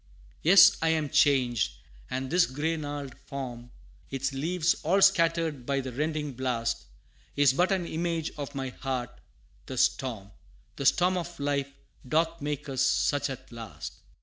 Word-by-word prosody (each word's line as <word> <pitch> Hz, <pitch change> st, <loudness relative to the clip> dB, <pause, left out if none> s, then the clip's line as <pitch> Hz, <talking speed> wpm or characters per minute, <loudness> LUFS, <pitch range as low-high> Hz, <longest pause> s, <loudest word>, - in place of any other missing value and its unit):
Yes 195 Hz, +3 st, +8 dB
I 165 Hz, -, +2 dB
am 155 Hz, -2 st, +1 dB
changed 125 Hz, -, +3 dB, 0.4 s
and 130 Hz, 0 st, -3 dB
this 175 Hz, 0 st, +4 dB
gray 150 Hz, +5 st, -1 dB
gnarled 145 Hz, -3 st, -5 dB
form, 125 Hz, -3 st, -6 dB, 0.4 s
Its 135 Hz, +1 st, -2 dB
leaves 165 Hz, +5 st, +1 dB
all 185 Hz, +6 st, +2 dB
scattered 165 Hz, -7 st, +3 dB
by 140 Hz, +2 st, 0 dB
the 130 Hz, -1 st, -5 dB
rending 150 Hz, +2 st, -2 dB
blast, 120 Hz, -2 st, -2 dB, 0.5 s
Is 145 Hz, -2 st, +4 dB
but 180 Hz, +7 st, +2 dB
an 185 Hz, -3 st, +1 dB
image 165 Hz, -1 st, -2 dB
of 145 Hz, -1 st, -6 dB
my 135 Hz, -1 st, -3 dB
heart; 125 Hz, -2 st, -4 dB, 0.6 s
the -, -, -6 dB
storm 110 Hz, -7 st, 0 dB, 0.5 s
The 140 Hz, -, +1 dB
storm 185 Hz, +1 st, +3 dB
of 175 Hz, -1 st, -6 dB
life, 140 Hz, -1 st, -1 dB, 0.4 s
doth 165 Hz, +2 st, +1 dB
make 150 Hz, +1 st, -3 dB
us 135 Hz, -2 st, -2 dB
such 145 Hz, +1 st, +2 dB
at 130 Hz, -2 st, -8 dB
last! 115 Hz, -2 st, -8 dB
145 Hz, 150 wpm, -28 LUFS, 130-165 Hz, 0.6 s, Yes